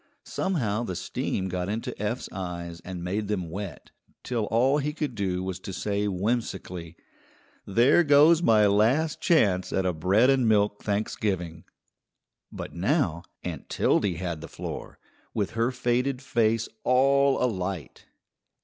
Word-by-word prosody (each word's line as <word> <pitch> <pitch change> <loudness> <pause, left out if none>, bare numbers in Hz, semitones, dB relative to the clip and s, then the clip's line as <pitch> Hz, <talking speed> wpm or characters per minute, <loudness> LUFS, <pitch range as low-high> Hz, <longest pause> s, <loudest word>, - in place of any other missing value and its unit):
Somehow 120 - -1
the 95 -7 -4
steam 95 +2 -2
got 90 0 -3
into 110 +2 -3
Eph's 105 +4 -2
eyes 85 -2 -5
and 90 -2 -6
made 100 +4 -2
them 95 -6 -2
wet, 100 0 -7 0.3
till 115 -4 -1
all 130 +7 +2
he 150 +1 -2
could 150 -4 -3
do 95 -4 -2
was 95 -1 -4
to 95 - -7
say 100 +2 -1
whimsically: 95 -4 -3 0.7
"There 120 - +5
goes 150 +3 +6
my 110 -9 +5
last 115 +11 +2
chance 100 - +3
at 95 - 0
a 90 - +1
bread 95 +11 +3
and 130 -4 +3
milk 105 -1 +2
Thanksgiving." 95 -5 -2 0.9
But - - -7
now 95 - 0 0.2
Aunt - - -6
Tildy 95 -4 +1
had 85 -2 -4
the 80 - -7
floor, - - -7 0.4
with 100 -3 -1
her 115 +2 +1
faded 125 +1 0
face 115 -3 +1 0.2
all 135 +2 +4
alight. 95 - -3
105 Hz, 140 wpm, -26 LUFS, 95-125 Hz, 0.9 s, goes